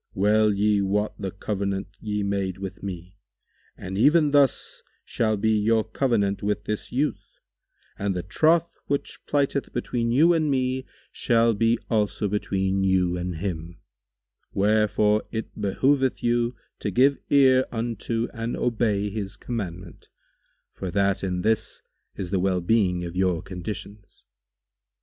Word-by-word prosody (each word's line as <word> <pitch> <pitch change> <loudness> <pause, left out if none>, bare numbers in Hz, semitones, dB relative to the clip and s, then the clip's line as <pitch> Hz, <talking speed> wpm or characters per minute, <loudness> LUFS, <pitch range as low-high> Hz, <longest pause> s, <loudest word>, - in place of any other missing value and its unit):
Well 105 +2 +3
ye 105 0 +2
wot 105 +2 0
the 100 -2 -3
covenant 100 0 -3
ye 105 -1 -2
made 100 -2 -1
with 95 -1 -7
me, 90 0 -7 0.6
and 95 +2 -5
even 150 +4 +5
thus 140 -3 +2 0.2
shall 110 -2 0
be 110 +2 +1
your 110 +1 +2
covenant 110 -4 0
with 105 0 -1
this 105 -1 -4
youth 145 +4 -2 0.6
and 100 -1 -1
the 90 - -3
troth 165 - +2
which 140 0 -3
plighted 140 -1 0
between 120 -1 -1
you 160 +8 +5
and 155 -2 +1
me 130 -1 0 0.2
shall 115 -1 +2
be 115 +2 +2
also 105 -2 0
between 95 -1 0
you 95 -2 +2
and 90 0 -3
him; 85 -1 -5 0.7
wherefore 105 +1 +2
it 110 -1 -5
behoveth 130 +6 +1
you 120 0 +1 0.2
to - - -2
give 135 +8 +3
ear 130 -2 +5
unto 115 0 -2
and 115 +1 -3
obey 110 -4 0
his 100 -2 -5
commandment, 95 -7 -6 0.6
for 95 - -5
that 100 +2 +1
in 90 -1 -2
this 110 0 -1 0.3
is 95 -2 -5
the 95 - +1
well 95 0 +1
being 90 -2 +1
of 85 +1 -7
your 90 -3 +1
conditions. 100 +2 -8
105 Hz, 140 wpm, -25 LUFS, 95-120 Hz, 0.7 s, even